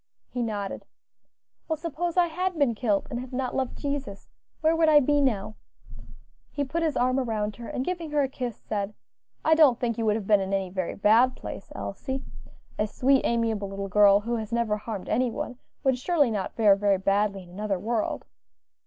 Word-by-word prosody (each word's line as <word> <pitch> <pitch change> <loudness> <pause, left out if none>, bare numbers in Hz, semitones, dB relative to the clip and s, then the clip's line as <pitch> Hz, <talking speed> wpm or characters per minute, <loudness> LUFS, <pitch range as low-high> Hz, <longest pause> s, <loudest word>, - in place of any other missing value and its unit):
He 245 - -2
nodded. 205 -4 -3 0.8
"Well, 320 - -1
suppose 335 +2 -3
I 355 - +6
had 360 +2 -2
been 280 -6 +3
killed, 210 -3 0
and 240 - -2
had 255 +1 -8
not 255 0 -2
loved 260 -2 -2
Jesus; 280 -8 -4 0.3
where 320 +1 +3
would 325 -1 +4
I 300 -1 +8
be 290 +1 +2
now?" 215 -5 0 0.9
He 285 - -2
put 305 +5 -2
his 315 -4 0
arm 255 +2 +2
round 215 -4 -2
her, 235 -1 -8
and 260 - -3
giving 345 -3 -3
her 295 -1 +2
a - - +1
kiss, 250 -4 -5
said, 205 0 -4 0.5
"I 315 - +5
don't 295 -7 +5
think 235 -2 -1
you 225 - 0
would 210 - +3
have 215 -3 -3
been 205 0 +5
in 190 +1 -1
any 190 -2 -2
very 185 -2 -3
bad 230 +5 +4
place, - - -8
Elsie; 265 -1 -4 0.6
a 210 - +2
sweet, 265 +5 +3
amiable 225 -4 0
little 195 0 -5
girl, 205 0 +6
who 235 +2 -2
has 220 0 -5
never 230 -3 +1
harmed 210 -2 -6
any 255 0 +1
one, 245 +2 -5 0.2
would 265 -2 +2
surely 290 -3 +2
not 205 -3 -3
fare 210 -3 +5
very 200 -1 +2
badly 195 0 0
in 175 - -16
another 200 +1 -2
world." 220 +4 -2
235 Hz, 200 wpm, -26 LUFS, 205-275 Hz, 0.9 s, I